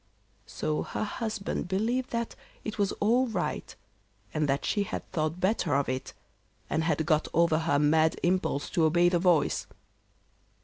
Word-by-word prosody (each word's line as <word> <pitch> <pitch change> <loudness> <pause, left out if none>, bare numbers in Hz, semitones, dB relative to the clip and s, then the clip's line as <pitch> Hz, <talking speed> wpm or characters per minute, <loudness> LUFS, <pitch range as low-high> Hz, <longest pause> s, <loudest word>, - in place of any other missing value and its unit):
So 155 0 -2
her - - -3
husband 215 -4 -3
believed 230 +7 0
that 235 -1 -3 0.3
it 215 0 -5
was 200 -1 +2
all 240 +5 +2
right, 200 -6 -3 0.6
and 155 -2 0
that 135 +1 0
she 205 - +1
had 200 - -4
thought 155 0 -1
better 185 -6 +1
of 140 0 +1
it, 130 0 -3 0.6
and 160 - +1
had 160 -1 +1
got 155 -1 +2
over 165 -1 +4
her 160 -3 +1
mad 155 +3 +3
impulse 175 -5 0
to 165 -3 +3
obey 175 +2 +4
the 175 -1 +1
voice. 175 -4 +2
175 Hz, 160 wpm, -28 LUFS, 155-205 Hz, 0.6 s, over